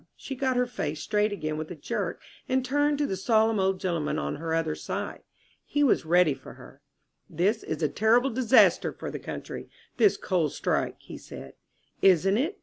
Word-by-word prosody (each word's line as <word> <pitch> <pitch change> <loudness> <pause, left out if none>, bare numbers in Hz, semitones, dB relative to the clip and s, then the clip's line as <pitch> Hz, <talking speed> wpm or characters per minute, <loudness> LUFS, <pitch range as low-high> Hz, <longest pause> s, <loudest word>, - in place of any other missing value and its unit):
She 275 - -7
got 260 -1 0
her 250 - +3
face 155 -11 -4
straight 210 +4 0
again 155 -6 -3
with 155 0 -5
a 175 - -6
jerk 145 - -3 0.3
and 260 0 +1
turned 290 +2 +1
to 290 - +1
the 195 - -2
solemn 220 +2 +2
old 190 0 +1
gentleman 170 -5 -1
on 70 0 -3
her 165 +2 -4
other 165 -1 0
side. - - -5 0.4
He 290 - 0
was 250 - +2
ready 175 -2 +4
for 130 0 -12
her. - - -15 0.5
"This 200 +8 +1
is 160 +1 -4
a - - +4
terrible 230 - +3
disaster 250 +1 +4
for - - -7
the - - -5
country, - - -7 0.3
this 415 - +4
coal 175 -5 0
strike," - - -1
he - - -10
said. - - -10 0.5
"Isn't 195 +1 +4
it?" 330 +10 -2
195 Hz, 190 wpm, -27 LUFS, 160-250 Hz, 0.5 s, ready